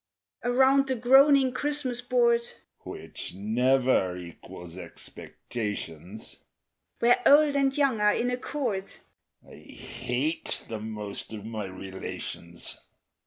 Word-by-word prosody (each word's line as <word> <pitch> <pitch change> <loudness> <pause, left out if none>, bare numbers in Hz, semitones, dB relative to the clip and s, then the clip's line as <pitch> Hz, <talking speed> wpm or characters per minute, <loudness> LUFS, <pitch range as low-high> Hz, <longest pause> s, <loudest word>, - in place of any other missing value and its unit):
_) - - +2
Around 265 +2 +4
the 260 - 0
groaning 265 +2 +6
Christmas 270 -3 -2
board, 240 -1 +3 0.4
(Which - - -7
never 120 -2 +2
equals 85 0 -10
expectations,) 100 -1 -6 0.6
Where 240 +1 +4
old 290 0 +6
and 275 0 +2
young 270 -7 +2
are 210 0 +5
in 245 +1 0
accord 250 -6 -3 0.5
(_I - - -14
hate 140 +7 -3
the 110 -1 -5
most 105 -1 -6
of 105 -1 -7
my 110 -2 -4
relations! 95 -2 -6
195 Hz, 110 wpm, -27 LUFS, -, 0.6 s, groaning